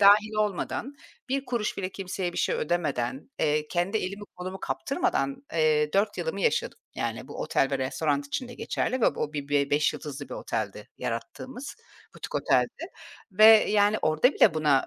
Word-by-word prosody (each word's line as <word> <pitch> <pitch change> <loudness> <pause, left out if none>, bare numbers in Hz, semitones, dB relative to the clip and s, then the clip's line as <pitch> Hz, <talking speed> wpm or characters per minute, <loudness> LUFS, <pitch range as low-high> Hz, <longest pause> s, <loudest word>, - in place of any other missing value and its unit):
dâhil 210 +2 +6
olmadan, 215 +6 -1 0.4
1 275 +1 -1
kuruş 235 -4 -2
bile 185 -2 -2
kimseye 185 -2 -4
bir - - -4
şey - - +1
ödemeden, 150 - -1
eee, 150 0 +1
kendi 175 +5 0
elimi 200 +2 -4
kolumu 185 +2 -6
kaptırmadan, 275 -1 -1 0.2
eee, 155 -2 +2
4 200 +2 +1
yılımı 485 - -2
yaşadım. 475 0 0 0.2
Yani, - - -3
bu - - -7
otel 135 - +1
ve 135 - 0
restoran 140 +2 -1
için 245 - -3
de 245 - -9
geçerli 255 +1 -2
ve - - +3
bu - - -7
o 150 - -2
bi 145 -1 -4
be 145 -1 +1
beş 145 +1 +3
yıldızlı 145 -2 -7
bir - - -6
oteldi - - -4
yarattığımız, 260 +2 -5 0.4
butik - - -8
oteldi - - +1 0.5
ve 215 +3 +5 0.3
yani, 205 0 +4
orada 155 - +3
bile 160 - +5
buna 150 -4 +3
185 Hz, 175 wpm, -27 LUFS, 150-215 Hz, 0.5 s, dâhil